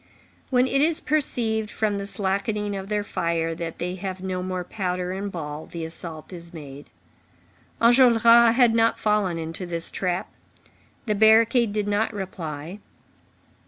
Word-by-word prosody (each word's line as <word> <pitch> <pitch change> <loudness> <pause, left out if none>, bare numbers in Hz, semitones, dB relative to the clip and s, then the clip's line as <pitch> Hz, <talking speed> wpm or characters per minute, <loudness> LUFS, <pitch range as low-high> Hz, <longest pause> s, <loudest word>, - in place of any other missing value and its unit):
When 250 -1 +3
it 275 +1 +1
is 320 +2 +2
perceived, 230 -9 0
from 210 -2 -1
the 200 - -5
slackening 205 +1 -2
of 195 0 -6
their 210 -1 0
fire, 165 -4 -1
that 165 0 -6
they 180 +1 -3
have 190 0 -5
no 185 -1 -2
more 185 0 -3
powder 180 -1 -3
and 195 +2 -4
ball, 150 -3 -6
the 165 -1 -6
assault 160 +1 -8
is 170 -1 -10
made. 145 -4 -10 0.9
Enjolras 235 -1 +6
had 245 -3 +5
not 230 0 +3
fallen 210 -5 +1
into 165 +3 -5
this 170 -1 -4
trap; 180 -2 -2 0.7
the 215 - +1
barricade 220 +2 +4
did 210 0 -2
not 205 +2 +1
reply. 170 -2 -6
195 Hz, 150 wpm, -24 LUFS, 170-220 Hz, 0.9 s, Enjolras